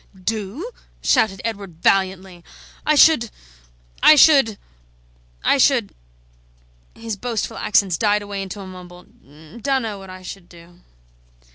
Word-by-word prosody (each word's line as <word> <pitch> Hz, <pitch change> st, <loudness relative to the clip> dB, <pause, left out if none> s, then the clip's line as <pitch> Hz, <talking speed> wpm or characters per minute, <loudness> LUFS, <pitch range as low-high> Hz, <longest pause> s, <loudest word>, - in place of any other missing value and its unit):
"Do?" 220 Hz, -, -4 dB, 0.3 s
shouted 195 Hz, -4 st, +1 dB
Edward, 200 Hz, -7 st, -6 dB
valiantly, 190 Hz, -2 st, 0 dB, 0.4 s
"I 305 Hz, -, +4 dB
should 285 Hz, -6 st, +5 dB, 0.7 s
I 310 Hz, -, +8 dB
should 275 Hz, -8 st, +5 dB, 0.9 s
I -, -, +2 dB
should -, -, +2 dB, 0.5 s
" -, -, -35 dB
His 225 Hz, -2 st, -5 dB
boastful 230 Hz, +1 st, -4 dB
accents 195 Hz, -6 st, +1 dB
died 210 Hz, -1 st, +1 dB
away 200 Hz, -1 st, -5 dB
into 195 Hz, +1 st, -7 dB
a -, -, -9 dB
mumble: 180 Hz, -1 st, -12 dB, 0.6 s
"Dunno 245 Hz, -7 st, -2 dB
what 195 Hz, -1 st, -12 dB
I 185 Hz, 0 st, -11 dB
should 180 Hz, -1 st, -10 dB
do." 175 Hz, 0 st, -17 dB
195 Hz, 125 wpm, -20 LUFS, 180-225 Hz, 0.9 s, I